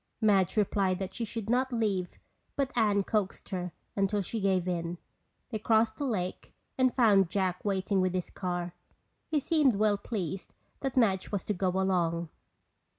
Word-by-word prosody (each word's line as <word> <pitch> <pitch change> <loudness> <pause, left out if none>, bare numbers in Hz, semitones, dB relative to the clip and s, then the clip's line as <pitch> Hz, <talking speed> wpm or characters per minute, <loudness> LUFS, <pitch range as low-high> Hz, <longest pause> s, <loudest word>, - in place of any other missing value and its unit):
Madge 205 -4 +3
replied 195 -2 +2
that 190 -1 -5
she 235 - -3
should 225 -1 -4
not 255 +3 +1
leave 205 -6 -1 0.4
but 275 -2 0
Anne 210 -4 +3
coaxed 205 -1 -1
her 180 -2 -3 0.2
until 200 +1 +1
she 225 +5 -3
gave 190 -3 +1
in. 170 -1 -2 0.5
They 220 - -2
crossed 220 0 +2
the 285 - -2
lake 185 -7 -3 0.2
and 255 -1 +3
found 205 -7 +5
Jack 185 -2 -1
waiting 195 -1 +1
with 185 0 0
his 180 - -2
car. 175 -2 -3 0.5
He 310 -2 +1
seemed 290 -5 +3
well 205 0 +2
pleased 190 -4 -4 0.2
that 270 -2 -3
Madge 195 -6 +2
was 200 -3 -2
to 210 - 0
go 185 0 0
along. 170 -3 +1
200 Hz, 165 wpm, -30 LUFS, 185-225 Hz, 0.5 s, found